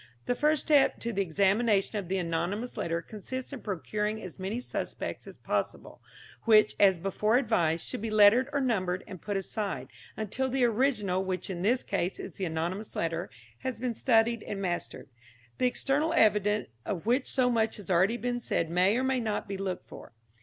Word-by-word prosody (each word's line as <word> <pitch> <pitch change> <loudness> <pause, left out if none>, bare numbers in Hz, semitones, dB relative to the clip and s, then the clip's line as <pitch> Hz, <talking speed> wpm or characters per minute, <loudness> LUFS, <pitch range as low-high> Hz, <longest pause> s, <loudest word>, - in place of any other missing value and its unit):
The - - +1
first 300 +3 +2
step 290 -3 +4
to 235 0 -2
the 200 - +1
examination 200 +3 +2
of 190 - -6
the 190 +2 0
anonymous 180 +7 -2
letter 170 0 -2
consists 255 +6 -6
in 275 - -6
procuring 210 +2 -2
as 185 -2 -9
many 195 +5 -3
suspects 250 - -5
as - - -10
possible, - - -3 0.4
which, 215 -2 +6
as 190 -3 +6
before 205 +6 +1
advised, 170 - +1
should - - -4
be 225 - -2
lettered 215 +5 +6
or 285 -1 0
numbered 185 -8 0
and 185 - -9
put 205 -1 -2
aside, 195 - -3 0.3
until 230 +5 -1
the 260 -1 +2
original, 215 -6 +1
which 185 0 -3
in 175 -2 -4
this 240 +7 +2
case 195 -2 -2
is - - -6
the 190 - -2
anonymous 175 +6 -3
letter, 165 +2 -2 0.3
has 260 -4 -3
been 245 +1 -2
studied 230 -1 +2
and 200 - -5
mastered. 180 -3 -3 0.5
The 250 - +4
external 285 +5 0
evidence 210 0 +3
of 190 -3 -4
which 250 +4 +1
so 250 -2 +2
much 225 -1 +1
has 195 -3 -7
already 190 +7 +3
been 245 +1 -2
said 165 -8 -1
may 185 +5 +3
or 255 - 0
may 260 -1 +1
not 220 -3 -2
be 200 - -4
looked 190 -2 -4
for. - - -12
210 Hz, 190 wpm, -29 LUFS, 185-240 Hz, 0.5 s, which